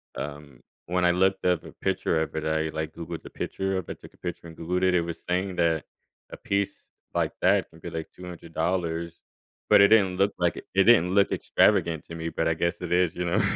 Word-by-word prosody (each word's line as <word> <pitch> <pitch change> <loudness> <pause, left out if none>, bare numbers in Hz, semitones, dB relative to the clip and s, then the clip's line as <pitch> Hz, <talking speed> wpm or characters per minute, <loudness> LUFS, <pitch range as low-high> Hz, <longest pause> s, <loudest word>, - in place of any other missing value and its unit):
um, 70 -3 -7 0.3
when 90 0 +1
I 90 - +5
looked 95 +2 +1
up 90 -2 +2
a - - -10
picture 95 -4 0
of 80 - -4
it, 80 - -2
I, 80 0 -1
like, 80 0 -3
Googled 85 0 -6
the - - -10
picture 95 0 -3
of 95 - -5
it, - - -7
took - - -13
a - - -24
picture, 90 -1 -6
and 80 - -12
Googled 90 +2 -2
it. 95 -1 +3
It 85 - +4
was 85 -1 -6
saying 90 +1 -1
that 80 -3 +2 0.5
a - - -7
piece 100 0 -2 0.2
like - - 0
that - - +3
could 80 0 -17
be, - - -6
like, 80 -1 -4
$200, 85 -1 -3 0.5
but - - +7
it 100 - +7
didn't 95 -5 +4
look 100 +1 +2
like 85 -2 +1
it - - -8
it 95 - +5
didn't 95 -6 +5
look 100 0 +4
extravagant 80 -3 +2
to 85 - -9
me, 80 0 -3
but 80 - -1
I 80 - +3
guess 85 +2 -1
it 85 - -5
is, 90 -2 +3
you 90 - -2
know? 85 - +2
85 Hz, 235 wpm, -26 LUFS, 80-90 Hz, 0.5 s, but